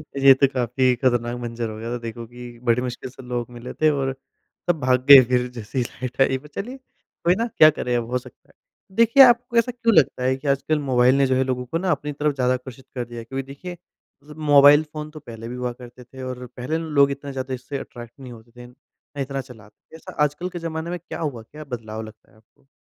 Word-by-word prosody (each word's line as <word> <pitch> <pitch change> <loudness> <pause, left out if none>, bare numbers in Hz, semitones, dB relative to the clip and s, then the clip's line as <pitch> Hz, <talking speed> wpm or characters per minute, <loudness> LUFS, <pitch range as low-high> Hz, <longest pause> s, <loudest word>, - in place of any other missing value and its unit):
ये 135 0 +7
तो 140 - +7
काफ़ी 125 0 +1
खतरनाक 120 -1 0
मंज़र 115 -1 -4
हो 110 - -7
गया 115 +1 -6
था। - - -2
देखो 115 0 -7
कि 120 0 -11
बड़ी 120 0 +2
मुश्किल 125 0 -5
से 130 +1 -13
लोग 120 -1 -3
मिले 120 +1 -8
थे 155 - +3
और 135 -3 -1 0.6
सब 170 -3 +2
भाग 125 -2 +1
गए, 140 -2 +12
फिर 125 0 0
जैसे 115 +1 -8
ही 125 - +2
लाइट 125 +2 -5
आई। 135 0 +3
पर 140 +3 -14
चलिए, 225 - -6
कोई 180 -8 -3
ना, 230 +4 -1
क्या 155 - +9
करें, 125 -5 -2
अब 115 -1 -4
हो 125 - +1
सकता 125 - -13
है। - - -23 0.4
देखिए, 230 +5 +7
आपको 240 -1 +4
ऐसा 235 +2 +3
क्यों 235 -1 +1
लगता 125 -2 +3
है 130 +1 +2
कि 145 - -8
आजकल 140 +3 +1
मोबाइल 130 -2 +3
ने 140 -1 +3
जो 130 - +1
है, 130 - +2
लोगों 125 -1 -2
को 145 +7 -2
ना 185 +1 0
अपनी 150 -2 -2
तरफ़ 150 +1 -1
ज़्यादा 125 -1 +1
आकर्षित 130 0 -8
कर 125 -1 -3
दिया 120 0 -9
है, 115 - -9
क्योंकि 135 +3 -4
देखिए, 175 +6 -8 0.5
ज़ 150 - -15 0.2
मोबाइल 145 +1 +8
फ़ोन 150 0 -6
तो 155 - -10
पहले 115 -5 -9
भी 120 - -6
हुआ 125 -1 -3
करते 125 0 -13
थे 130 +2 -12
और 125 -1 -6
पहले 125 +6 -2
ना, 165 - -5
लोग 140 -2 +4
इतना 140 0 -6
ज़्यादा 130 0 -4
इससे 130 +3 -5
अट्रैक्ट 120 -1 -10
नहीं 130 -2 -10
होते 115 0 -14
थे, 120 +1 -13
इन 120 0 -15 0.4
इतना 135 0 -3
चलाते 115 -5 -15 0.2
थे। - - -12
ऐसा 160 - -11
आजकल 150 +5 -2
के 175 - -7
ज़माने 165 0 -4
में 175 0 -4
क्या - - -8
हुआ? 140 -8 -3
क्या 150 +7 -11
बदलाव 110 -5 -6
लगता 110 0 -13
है - - -24
आपको? 110 +4 -30
130 Hz, 250 wpm, -23 LUFS, 120-150 Hz, 0.6 s, गए